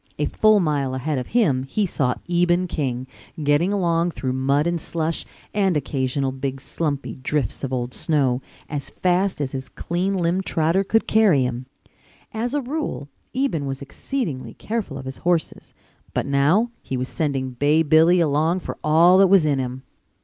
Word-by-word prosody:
A - - 0
full 215 -1 +4
mile 145 -6 0
ahead 135 +2 -1
of 125 - -5
him 180 - +2
he 165 +11 -1
saw 140 -8 0
Eben 175 +1 +2
King, 130 -7 -2 0.4
getting 145 +6 +2
along 170 -3 +1
through 130 -6 -3
mud 135 +3 +1
and 170 -1 -1
slush, 165 0 -2 0.3
and 195 -5 +2
occasional 135 -1 -1
big 135 0 -4
slumpy 145 0 -3
drifts 135 0 -2
of 135 - -2
old 125 -1 -2
snow, 135 -5 +1 0.3
as 145 -2 -4
fast 185 0 0
as 140 -3 -2
his 130 -1 -5
clean 185 +3 -2
limbed 180 +2 0
trotter 165 +4 +2
could 225 +3 +1
carry 200 -11 +4
him. 125 0 -3 0.7
As 235 +5 -2
a 290 - +1
rule 265 - -4 0.3
Eben 255 - 0
was 135 0 -4
exceedingly 140 - -4
careful 210 -11 -4
of 135 - -8
his 130 0 -7
horses, 175 -2 -1 0.4
but - - 0
now 150 +12 +2
he 130 - -4
was 125 +1 -2
sending 135 -4 -2
Bay 145 +6 +2
Billy 160 +3 +5
along 160 +3 +2
for - - -7
all 170 +4 +6
that 195 - +7
was 185 -4 +5
in 145 -3 +1
him. 130 0 -4
155 Hz, 170 wpm, -22 LUFS, 135-180 Hz, 0.7 s, that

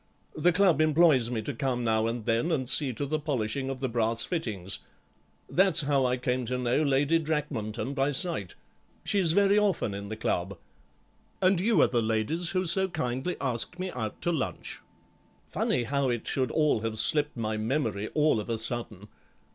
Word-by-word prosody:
The 170 +3 +3
Club 180 -4 +3
employs 155 -6 +4
me 115 -3 -3
to 145 - -4
come 125 -1 -2
now 110 -1 +1
and 115 -1 -4
then 115 +9 +1
and 130 -6 -1
see 135 +1 +3
to 145 - -3
the 155 +2 -1
polishing 135 -3 -2
of 135 -1 -5
the 130 - 0
brass 115 -1 0
fittings. 105 - -2 0.7
That's 190 -1 +3
how 140 -2 +2
I 125 0 0
came 125 0 -1
to 125 +2 -2
know 125 +3 +1
Lady 145 +2 +2
Drakmanton 140 -7 -3
by 140 +1 +1
sight; 145 - 0 0.5
she's 185 -6 +2
very 200 +2 +4
often 195 - 0
in 100 0 -6
the 110 - -5
Club. 95 -2 -2 0.8
And 185 -1 +3
you 220 +5 +2
are - - +5
the 120 -2 0
ladies 115 +10 -1
who 185 -1 -1
so 190 +3 +3
kindly 130 -1 -3
asked 125 +5 -2
me 185 0 -4
out 110 -4 -5
to 175 - +2
lunch. 155 -6 -4 0.7
Funny 125 - 0
how 140 +2 0
it 120 -2 -2
should 130 -3 0
all 150 -5 +2
have 110 0 -3
slipped 145 +6 +2
my 110 -1 -2
memory, 110 -3 -1
all 150 -6 +3
of 105 - -6
a 115 - -1
sudden. 115 -3 -4
130 Hz, 185 wpm, -28 LUFS, 115-155 Hz, 0.8 s, are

